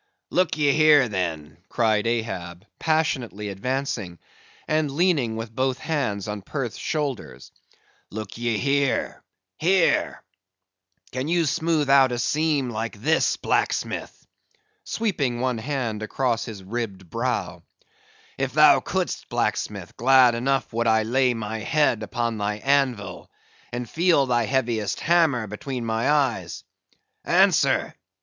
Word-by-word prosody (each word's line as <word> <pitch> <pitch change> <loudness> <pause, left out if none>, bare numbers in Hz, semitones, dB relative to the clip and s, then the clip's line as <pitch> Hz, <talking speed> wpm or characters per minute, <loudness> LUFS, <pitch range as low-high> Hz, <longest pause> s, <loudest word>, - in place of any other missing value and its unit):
"Look 180 -3 +1
ye 145 -2 +3
here, 150 -3 +5
then," 80 -7 -4
cried 110 -1 +1
Ahab, 95 -6 -3
passionately 130 -10 -1
advancing, 110 -3 -3 0.5
and 155 -1 +1
leaning 145 -7 +1
with 115 0 -6
both 130 0 0
hands 125 - -2
on 105 -1 -4
Perth's 120 +2 -5
shoulders; 130 - -4 0.6
"look 105 -1 -7
ye 115 -1 -1
here—here—can 95 - -2
ye 170 0 +2
smoothe 155 0 0
out 135 -2 +6
a 120 - -2
seam 140 +3 0
like 110 -1 -4
this, 160 +8 +2
blacksmith," - - -2 0.6
sweeping 145 - -1
one 125 -2 -1
hand 120 -4 -3
across 115 +1 -1
his 105 -4 -8
ribbed 100 -3 -5
brow; 80 - -3 0.8
"if - - -1
thou - - +7
could'st, - - -3
blacksmith, - - -2
glad 130 0 +5
enough 130 +2 -1
would 115 +1 0
I 110 -1 +3
lay 125 +2 +2
my 110 0 -4
head 135 -1 +1
upon 115 0 -2
thy 105 0 -1
anvil, 125 -6 -1 0.4
and 120 0 -4
feel 165 0 +3
thy 120 -2 +1
heaviest 115 -5 -1
hammer 160 -9 +2
between 120 +4 -5
my 115 +3 0
eyes. 130 - 0 0.6
Answer! - - +3
120 Hz, 120 wpm, -24 LUFS, 105-140 Hz, 0.8 s, thou